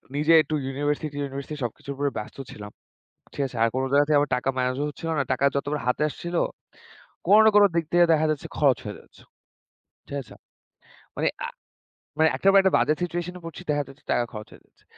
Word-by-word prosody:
নিজে 150 +3 +3
একটু 155 +1 -3
university 145 +2 -2
university 140 +2 -5
সবকিছুর 140 +4 -5
উপরে 140 0 -1
ব্যস্ত 105 - -7
ছিলাম, 105 -1 -9 0.6
ঠিক 140 - -2
আছে? 125 - -13
আর - - +5
কোন 130 - +1
জায়গা 145 +1 +5
থেকে 150 -1 +4
আমার 145 - -2
টাকা 130 - -2
ম্যানেজও 130 +3 0
হচ্ছিল 165 +3 -6
না। 140 - +2
টাকা 135 +2 +1
যতবার 145 +1 -1
হাতে 125 - +1
আসছিল, 175 +4 -6 0.9
কোন 205 +3 +7
না - - +8
কোন 205 - +8
দিক 170 -1 +1
থেকে 175 0 +6
দেখা 155 0 +2
যাচ্ছে 150 - -4
খরচ 140 -4 +4
হয়ে 105 - -6
যাচ্ছে, - - -21 0.9
ঠিক 140 - -4
আছে? 120 - -14 0.8
মানে - - +1 0.2
আ - - -6 0.7
মানে 160 0 +5
একটার 195 - +4
একটা 190 - +2
বাজে 155 - +3
সিচুয়েশন 175 0 -3
এ - - -15
পড়ছি। 165 +2 -8
দেখা 145 0 +1
যাচ্ছে 135 +2 -16
টাকা 120 - +2
খরচ 105 -1 -8
হয়ে - - -15
যাচ্ছে। - - -34
145 Hz, 200 wpm, -25 LUFS, 135-160 Hz, 0.9 s, না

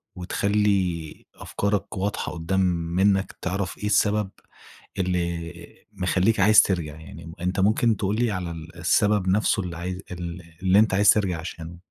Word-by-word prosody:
وتخلي 95 -3 -1
أفكارك 100 -1 -3
واضحة 100 +2 -2
قدّام 90 +3 -2 0.4
منّك، 95 0 +2
تعرف 95 -1 -3
إيه 105 - -6
السبب 105 -1 +2 0.7
اللي 85 -1 -4
مخليك 95 +3 +1
عايز 105 +2 +7
ترجع. 80 -6 -2
يعني 80 +1 -11
أنت 90 +2 -1
ممكن 110 +2 +2
تقول 100 +2 -1
لي 120 -1 +1
على 90 -3 -3
ال 85 +1 -10
السبب 95 +3 +2
نفسه 100 0 +2
اللي 85 -2 -6
عايز 90 +2 -5
ال 90 0 -6 0.2
اللي 95 +2 +5
أنت 110 -3 +3
عايز 100 +1 +4
ترجع 95 -6 +2
عشانه؟ 85 0 -8
95 Hz, 145 wpm, -24 LUFS, 85-100 Hz, 0.7 s, عايز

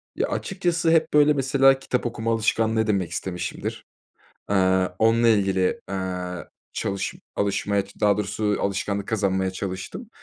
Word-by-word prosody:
Ya, - - 0
açıkçası 175 -4 0
hep, 160 -2 +2
böyle, 150 0 +6
mesela, 135 -1 +4
kitap 125 -2 -2
okuma 115 -1 -2
alışkanlığı 110 0 +1
edinmek 100 -6 0
istemişimdir. 90 -1 -4 0.6
Eee, 95 -2 +3
onunla 115 +1 +4
ilgili, 95 -4 +2
eee, 90 -2 -4 0.3
çalış 100 0 -2 0.2
alışmaya, 100 0 0 0.2
daha 105 -1 +3
doğrusu 105 0 -1
alışkanlık 100 0 -2
kazanmaya 95 -3 0
çalıştım. 95 - -6
105 Hz, 125 wpm, -24 LUFS, 95-120 Hz, 0.6 s, böyle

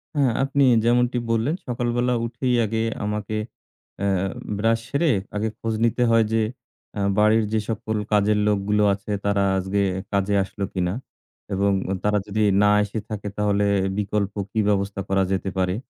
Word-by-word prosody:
হ্যাঁ, 135 -4 +3
আপনি 140 +1 +2 0.2
যেমনটি 125 +1 +2
বললেন 115 +9 +1
সকালবেলা 120 0 0
উঠেই 125 +1 -1
আগে 110 +1 -1 0.2
আমাকে 105 0 -3 0.6
অ্যা 100 0 0 0.5
ব্রাশ 115 +2 +2
সেরে 150 +1 +2 0.2
আগে 110 +2 0
খোঁজ 115 -1 -2
নিতে 115 +2 +1
হয় 115 -1 +5
যে 115 - +3 0.5
অ্যা 100 - -3 0.2
বাড়ির 110 +1 +4
যে 110 - +3
সকল 110 0 -2
কাজের 105 0 +3
লোকগুলো 105 0 +1
আছে 100 +1 -6
তারা 100 -1 +2
আজকে 95 +2 0 0.3
কাজে 100 0 +1
আসলো 100 +1 -4
কিনা। 90 -1 -1 0.6
এবং 100 +1 +2 0.3
তারা 105 0 +2
যদি 105 +2 -1 0.2
না 105 - +5
এসে 105 +2 -4
থাকে 105 -1 -5
তাহলে 105 -1 +1 0.3
বিকল্প 105 -1 -1 0.2
কি 110 - -1
ব্যবস্থা 100 -1 0
করা 95 0 +2
যেতে 95 0 -1
পারে। 90 0 +1
105 Hz, 155 wpm, -23 LUFS, 100-115 Hz, 0.6 s, হয়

